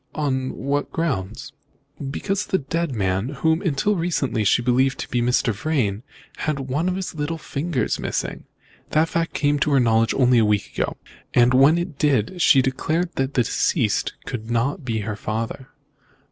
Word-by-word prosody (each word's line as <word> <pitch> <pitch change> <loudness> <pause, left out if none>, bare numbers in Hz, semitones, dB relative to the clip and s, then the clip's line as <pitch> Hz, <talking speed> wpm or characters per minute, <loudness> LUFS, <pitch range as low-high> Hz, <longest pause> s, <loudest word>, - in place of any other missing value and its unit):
"On 130 -4 -1
what 140 +2 -2
grounds?" 135 - -3 0.6
"Because 195 +8 -2
the 190 - +2
dead 165 -1 -2
man, 95 +2 0
whom, 160 +4 +1
until 180 +4 +1
lately, 155 - 0
she 115 +4 +3
believed 130 +2 +2
to - - -5
be 120 - 0
Mr. 120 -1 +2
Vrain, 110 -4 -1 0.4
had 150 -3 -2
one 140 +7 -1
of 185 - -1
his 190 -1 -4
little 155 +1 -3
fingers 150 -4 -2
missing. - - -3 0.4
That 160 +2 +2
fact 165 0 -1
came 145 0 +1
to 150 - +1
her 135 - +5
knowledge 115 -2 +3
only 125 -2 +4
a - - +4
week 105 -2 +1
ago. - - -2 0.4
When 130 +6 +5
it 175 -4 -4
did, 145 - +1
she 135 -4 +6
declared 160 +7 -1
that 135 +1 -1
the 125 - +4
deceased 115 - 0
could 110 -2 -5
not 120 +6 0
be 115 -4 -2
her 105 0 -4
father." 115 +5 -4
135 Hz, 170 wpm, -22 LUFS, 120-160 Hz, 0.6 s, she